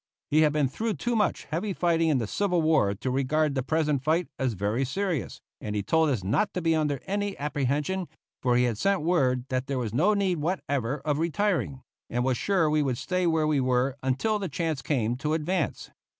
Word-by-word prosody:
He 155 Hz, +2 st, +5 dB
had 155 Hz, -1 st, +4 dB
been 150 Hz, -2 st, +2 dB
through 220 Hz, -, -2 dB
too 240 Hz, -1 st, -1 dB
much 210 Hz, -2 st, +1 dB
heavy 180 Hz, +7 st, -3 dB
fighting 165 Hz, -2 st, +2 dB
in 150 Hz, -, +3 dB
the 115 Hz, -, -1 dB
Civil 180 Hz, -, 0 dB
War 145 Hz, -11 st, +3 dB
to 130 Hz, +6 st, -3 dB
regard 140 Hz, +3 st, +1 dB
the 135 Hz, -, 0 dB
present 150 Hz, 0 st, 0 dB
fight 160 Hz, +3 st, +1 dB
as 130 Hz, -3 st, 0 dB
very 105 Hz, +6 st, -1 dB
serious, 175 Hz, +2 st, -2 dB, 0.2 s
and 105 Hz, -1 st, -4 dB
he 100 Hz, -, -1 dB
told 160 Hz, +6 st, +2 dB
us 120 Hz, -9 st, -1 dB
not 120 Hz, -, 0 dB
to -, -, 0 dB
be 165 Hz, -1 st, +3 dB
under 150 Hz, -4 st, 0 dB
any 205 Hz, 0 st, -2 dB
apprehension, 145 Hz, +5 st, -1 dB, 0.3 s
for 125 Hz, -2 st, +2 dB
he 125 Hz, -, +4 dB
had 115 Hz, -4 st, 0 dB
sent 195 Hz, -5 st, +1 dB
word 130 Hz, -7 st, +2 dB
that 130 Hz, +1 st, -1 dB
there 135 Hz, -1 st, -2 dB
was 115 Hz, -4 st, -3 dB
no 180 Hz, -, +3 dB
need 190 Hz, -4 st, +1 dB
whatever 145 Hz, -5 st, -2 dB
of 150 Hz, -1 st, -1 dB
retiring, 170 Hz, -5 st, 0 dB, 0.3 s
and 120 Hz, 0 st, -1 dB
was 130 Hz, -1 st, +2 dB
sure 185 Hz, +4 st, +1 dB
we 150 Hz, 0 st, +2 dB
would 130 Hz, -4 st, 0 dB
stay 180 Hz, +3 st, -1 dB
where 160 Hz, -2 st, +2 dB
we 150 Hz, -2 st, +2 dB
were 130 Hz, +1 st, +1 dB
until 135 Hz, -, 0 dB
the 195 Hz, -3 st, -3 dB
chance 160 Hz, -2 st, -2 dB
came 120 Hz, -3 st, 0 dB
to 150 Hz, +3 st, -1 dB
advance. 165 Hz, -1 st, -2 dB
150 Hz, 215 wpm, -27 LUFS, 130-175 Hz, 0.3 s, He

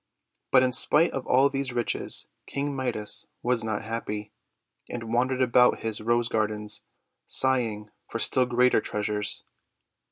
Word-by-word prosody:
But 130 Hz, -1 st, +6 dB
in 130 Hz, -, +2 dB
spite 155 Hz, +6 st, +3 dB
of 135 Hz, -, -4 dB
all 135 Hz, +2 st, +5 dB
these 135 Hz, -2 st, -3 dB
riches 120 Hz, -1 st, -1 dB, 0.2 s
King 140 Hz, 0 st, -2 dB
Midas 120 Hz, -6 st, -2 dB, 0.2 s
was 120 Hz, -1 st, +1 dB
not 110 Hz, -1 st, -2 dB
happy, 105 Hz, -2 st, -4 dB, 0.6 s
and 115 Hz, -1 st, -5 dB
wandered 130 Hz, +2 st, +2 dB
about 125 Hz, 0 st, +4 dB
his 110 Hz, -2 st, -2 dB
Rose 120 Hz, +1 st, +2 dB
Gardens, 105 Hz, -2 st, -1 dB, 0.5 s
sighing 115 Hz, -6 st, 0 dB, 0.2 s
for -, -, -4 dB
still 125 Hz, +2 st, +2 dB
greater 125 Hz, -1 st, +3 dB
treasures. 105 Hz, -1 st, -2 dB
120 Hz, 135 wpm, -27 LUFS, 110-130 Hz, 0.6 s, But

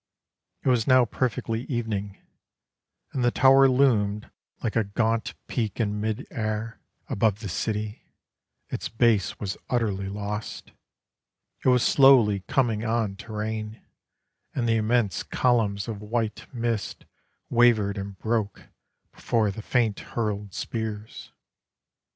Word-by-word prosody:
It -, -, +2 dB
was 120 Hz, -3 st, +2 dB
now 130 Hz, -2 st, +6 dB
perfectly 115 Hz, 0 st, -2 dB
evening: 110 Hz, -6 st, -3 dB, 1.0 s
And 130 Hz, -, -1 dB
the 120 Hz, -, +5 dB
tower 135 Hz, +2 st, +6 dB
loomed 110 Hz, -6 st, +2 dB, 0.3 s
like 110 Hz, -, -1 dB
a 115 Hz, -, +3 dB
gaunt 115 Hz, +2 st, -1 dB
peak 110 Hz, -3 st, -3 dB
in 105 Hz, -2 st, -1 dB
mid 110 Hz, 0 st, -2 dB
air 110 Hz, 0 st, -3 dB, 0.3 s
Above 105 Hz, 0 st, +1 dB
the 105 Hz, -, -4 dB
city: 105 Hz, +3 st, -3 dB, 0.6 s
its -, -, -4 dB
base 115 Hz, -3 st, +2 dB
was 95 Hz, -3 st, -4 dB
utterly 100 Hz, -6 st, 0 dB
lost. 105 Hz, +1 st, -5 dB, 0.9 s
It -, -, +4 dB
was 125 Hz, -1 st, +4 dB
slowly 135 Hz, -, +6 dB
coming 115 Hz, -5 st, +1 dB
on 110 Hz, -3 st, 0 dB
to 110 Hz, +2 st, -9 dB
rain, 110 Hz, +1 st, -4 dB, 0.8 s
And 120 Hz, -2 st, 0 dB
the 115 Hz, 0 st, +3 dB
immense 110 Hz, -2 st, +1 dB
columns 110 Hz, -5 st, +1 dB
of 105 Hz, -3 st, -5 dB
white 110 Hz, 0 st, -3 dB
mist 115 Hz, -4 st, -3 dB, 0.5 s
Wavered 115 Hz, -4 st, +4 dB
and 100 Hz, 0 st, -7 dB
broke 110 Hz, 0 st, -2 dB, 0.4 s
before 110 Hz, -3 st, 0 dB
the 110 Hz, -, -7 dB
faint 115 Hz, -2 st, +1 dB
hurled 105 Hz, -4 st, -4 dB
spears. 110 Hz, -2 st, -5 dB
110 Hz, 125 wpm, -26 LUFS, 105-120 Hz, 1.0 s, now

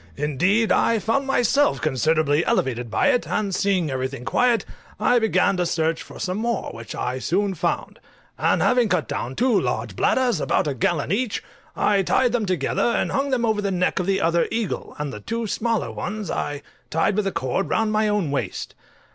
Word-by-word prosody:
Indeed, 180 Hz, -, +1 dB
I 230 Hz, -, +3 dB
found 230 Hz, +6 st, 0 dB
myself 270 Hz, +2 st, +2 dB
considerably 155 Hz, +2 st, +1 dB
elevated 120 Hz, -2 st, 0 dB
by -, -, +2 dB
it, 245 Hz, -, +1 dB
and 200 Hz, -2 st, -1 dB
seeing 185 Hz, -6 st, +1 dB
everything 130 Hz, -1 st, -4 dB
quiet, 245 Hz, -, +2 dB, 0.3 s
I 245 Hz, -, +4 dB
began 205 Hz, -3 st, +2 dB
to 180 Hz, -, +1 dB
search 160 Hz, -1 st, 0 dB
for -, -, -11 dB
some 185 Hz, +2 st, -2 dB
more, 235 Hz, +1 st, -2 dB
which 115 Hz, 0 st, -8 dB
I 125 Hz, +1 st, -2 dB
soon 195 Hz, +7 st, 0 dB
found; 170 Hz, -, -2 dB, 0.4 s
and -, -, +1 dB
having 245 Hz, -3 st, +3 dB
cut 180 Hz, -5 st, +1 dB
down 125 Hz, +3 st, -4 dB
two 245 Hz, -5 st, +2 dB
large -, -, -3 dB
bladders, 245 Hz, -, +1 dB
about -, -, +1 dB
a 145 Hz, -, -1 dB
gallon 145 Hz, +4 st, 0 dB
each, 225 Hz, +2 st, -1 dB, 0.3 s
I 200 Hz, -2 st, +2 dB
tied 245 Hz, +6 st, +2 dB
them 230 Hz, -4 st, 0 dB
together, 180 Hz, -7 st, 0 dB
and 235 Hz, -, +1 dB
hung 275 Hz, +1 st, 0 dB
them 250 Hz, -3 st, +1 dB
over 215 Hz, -2 st, +1 dB
the 200 Hz, -, -1 dB
neck 180 Hz, -1 st, 0 dB
of 180 Hz, -, -2 dB
the 195 Hz, 0 st, +1 dB
other 170 Hz, 0 st, +2 dB
eagle, 225 Hz, -5 st, -3 dB
and 150 Hz, -2 st, -4 dB
the 105 Hz, -, -6 dB
two 230 Hz, -, -3 dB
smaller 225 Hz, +1 st, -1 dB
ones 210 Hz, -3 st, -4 dB
I 145 Hz, 0 st, -3 dB, 0.3 s
tied 165 Hz, +5 st, +1 dB
with 210 Hz, -1 st, 0 dB
a -, -, 0 dB
cord 130 Hz, +8 st, -2 dB
round 225 Hz, -1 st, +1 dB
my 215 Hz, 0 st, +2 dB
own 205 Hz, -8 st, 0 dB
waist. 140 Hz, -, -3 dB
195 Hz, 195 wpm, -23 LUFS, 155-225 Hz, 0.4 s, I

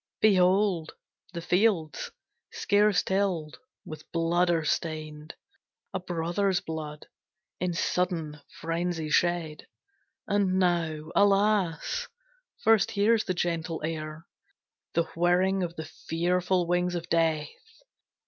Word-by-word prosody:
Behold, 185 Hz, -4 st, +3 dB, 0.4 s
the 170 Hz, -2 st, -6 dB
fields, 175 Hz, -5 st, +1 dB, 0.4 s
scarce 205 Hz, -1 st, +2 dB
tilled, 190 Hz, -5 st, -1 dB, 0.3 s
with 155 Hz, -, -10 dB
blood 170 Hz, +1 st, +1 dB
are 165 Hz, -2 st, +1 dB
stained, 155 Hz, -1 st, -3 dB, 0.6 s
A -, -, -1 dB
brother's 180 Hz, +2 st, 0 dB
blood, 155 Hz, -4 st, -6 dB, 0.5 s
in 180 Hz, -1 st, -1 dB
sudden 165 Hz, -5 st, -1 dB, 0.2 s
frenzy 165 Hz, -1 st, -2 dB
shed; 170 Hz, -3 st, 0 dB, 0.6 s
And 200 Hz, -2 st, +1 dB
now, 165 Hz, -4 st, 0 dB
alas, 200 Hz, -, +2 dB, 0.6 s
first 220 Hz, -3 st, +4 dB
hears 220 Hz, +2 st, +2 dB
the 185 Hz, -, -1 dB
gentle 165 Hz, -1 st, -2 dB
air 155 Hz, 0 st, -5 dB, 0.7 s
The 170 Hz, -, +3 dB
whirring 180 Hz, +3 st, +2 dB
of 170 Hz, -1 st, -3 dB
the 160 Hz, -, -6 dB
fearful 180 Hz, +3 st, 0 dB
wings 175 Hz, +1 st, 0 dB
of 175 Hz, 0 st, -4 dB
Death. 160 Hz, -3 st, +1 dB
175 Hz, 105 wpm, -28 LUFS, 160-190 Hz, 0.7 s, first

